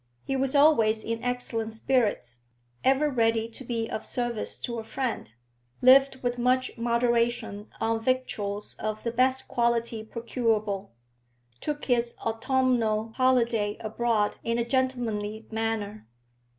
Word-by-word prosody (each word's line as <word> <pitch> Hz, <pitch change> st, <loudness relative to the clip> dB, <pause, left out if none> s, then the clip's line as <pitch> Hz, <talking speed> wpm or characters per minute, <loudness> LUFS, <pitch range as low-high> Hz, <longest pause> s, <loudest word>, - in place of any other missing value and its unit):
He 270 Hz, -, -2 dB
was 270 Hz, +1 st, 0 dB
always 230 Hz, -7 st, +4 dB
in 230 Hz, +1 st, -3 dB
excellent 240 Hz, -3 st, -2 dB
spirits, 205 Hz, -, 0 dB, 0.4 s
ever 270 Hz, +3 st, +3 dB
ready 225 Hz, -4 st, +1 dB
to 235 Hz, -, -7 dB
be 230 Hz, -2 st, -2 dB
of 215 Hz, -, -4 dB
service 240 Hz, -3 st, -3 dB
to 235 Hz, -1 st, -3 dB
a -, -, -5 dB
friend, 240 Hz, -, -3 dB, 0.5 s
lived 265 Hz, +1 st, +5 dB
with 245 Hz, 0 st, -1 dB
much 255 Hz, +1 st, +1 dB
moderation 235 Hz, -3 st, 0 dB
on 225 Hz, 0 st, +1 dB
victuals 215 Hz, -5 st, -1 dB
of 215 Hz, 0 st, -3 dB
the 235 Hz, -, -1 dB
best 260 Hz, +2 st, +1 dB
quality 235 Hz, -2 st, 0 dB
procurable, 220 Hz, -3 st, -1 dB, 0.7 s
took 295 Hz, 0 st, -4 dB
his 240 Hz, -2 st, +1 dB
autumnal 225 Hz, -2 st, +1 dB
holiday 235 Hz, -5 st, +2 dB
abroad 220 Hz, -1 st, 0 dB
in 230 Hz, 0 st, 0 dB
a 235 Hz, -, 0 dB
gentlemanly 235 Hz, -5 st, -1 dB
manner. 220 Hz, -, -3 dB
235 Hz, 125 wpm, -27 LUFS, 220-255 Hz, 0.7 s, lived